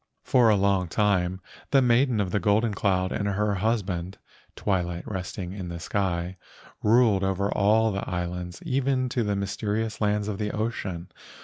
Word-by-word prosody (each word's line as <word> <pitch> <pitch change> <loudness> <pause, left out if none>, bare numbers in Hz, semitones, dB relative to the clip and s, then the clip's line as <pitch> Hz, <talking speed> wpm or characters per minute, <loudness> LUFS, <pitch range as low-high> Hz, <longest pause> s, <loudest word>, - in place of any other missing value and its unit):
For 120 -3 +4
a 105 - +5
long 100 -2 +2
time 95 -1 +1 0.3
the 140 - +5
Maiden 125 -1 +3
of 95 -3 -1
the 105 - +1
Golden 110 +1 +2
Cloud 95 -2 +1
and 100 - -1
her 105 +1 0
husband, 95 -3 -1 0.4
Twilight 90 -3 -1
Resting 95 -2 -5
in 95 -3 -6
the 85 0 -6
Sky, 90 -1 -2 0.4
ruled 110 -3 +4
over 95 +1 0
all 110 +2 +3
the 100 0 -4
islands 90 0 -4
even 130 -1 0
to 125 0 -1
the 105 -2 0
mysterious 105 +3 -2
lands 105 0 +1
of 105 -2 -3
the 105 -1 -1
ocean. 100 -6 -3
100 Hz, 165 wpm, -26 LUFS, 95-110 Hz, 0.4 s, a